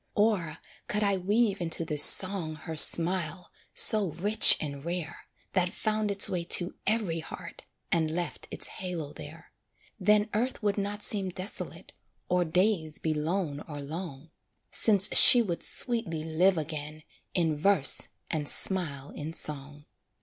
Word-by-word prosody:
Or 200 -8 -2 0.3
could 210 0 -2
I 200 -1 -1
weave 205 +1 -2
into 165 -1 -1
this 150 -2 +3
song 185 -5 +6
Her 160 +2 -9
smile, 175 +2 +2 0.2
so 215 -3 +7
rich 205 +6 +5
and 140 -2 -8
rare, 170 -1 -8 0.3
That 180 -1 0
found 215 +2 -4
its 200 0 +1
way 175 -2 -5
to 175 +1 +2
every 200 -8 -2
heart, 170 +1 -12 0.3
And 160 -2 -1
left 175 +2 -6
its - - -2
halo 170 -6 -6
there 160 +2 -14 0.5
Then 210 +2 +1
earth 235 +2 -4
would 205 -1 -2
not 205 +1 -6
seem 195 -3 0
desolate, 185 +3 -7 0.4
Or 180 0 0
days 170 -2 -2
be 160 - -4
lone 155 -1 -5
or 150 -2 -9
long, 155 0 -10 0.4
Since 205 -2 +2
she 245 -1 +10
would 175 -6 -6
sweetly 205 -11 -1
live 170 +4 -1
again 155 0 -8 0.3
In 165 -4 -1
verse, 155 -3 +2 0.2
and 150 -2 -4
smile 145 -8 -3
in 155 +2 -9
song. 145 -2 -4
175 Hz, 145 wpm, -26 LUFS, 155-200 Hz, 0.5 s, she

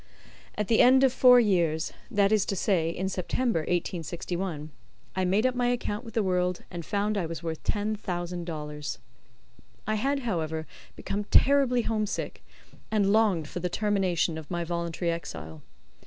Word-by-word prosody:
At 210 - -1
the 225 - +3
end 260 +2 +6
of 260 -2 +4
four 250 -1 +7
years 170 -8 +1 0.2
that 200 0 +2
is 215 -3 +4
to 195 - -1
say, 175 -4 +1
in 185 +3 -2
September, 195 +3 0
1861 170 -1 -3 0.4
I 185 - +1
made 200 +6 +2
up 255 - +3
my 245 -1 0
account 240 -2 -1
with 225 -3 -11
the 225 - +2
world, 180 -1 0
and 175 -2 -5
found 205 +2 0
I 170 - -2
was 165 0 -6
worth 160 -1 -4
ten 210 +1 -1
thousand 175 -3 -4
dollars. 150 -3 -5 0.9
I 215 - 0
had, 275 +6 0
however, 160 -8 -2 0.3
become 205 +1 -3
terribly 260 -1 +4
homesick, 215 -2 -2 0.5
and 205 -2 +2
longed 200 -8 +3
for 175 - -5
the 180 +1 -2
termination 185 -5 0
of 155 - -12
my 175 -1 -2
voluntary 170 0 -2
exile. 80 - -6
185 Hz, 165 wpm, -28 LUFS, 170-215 Hz, 0.9 s, four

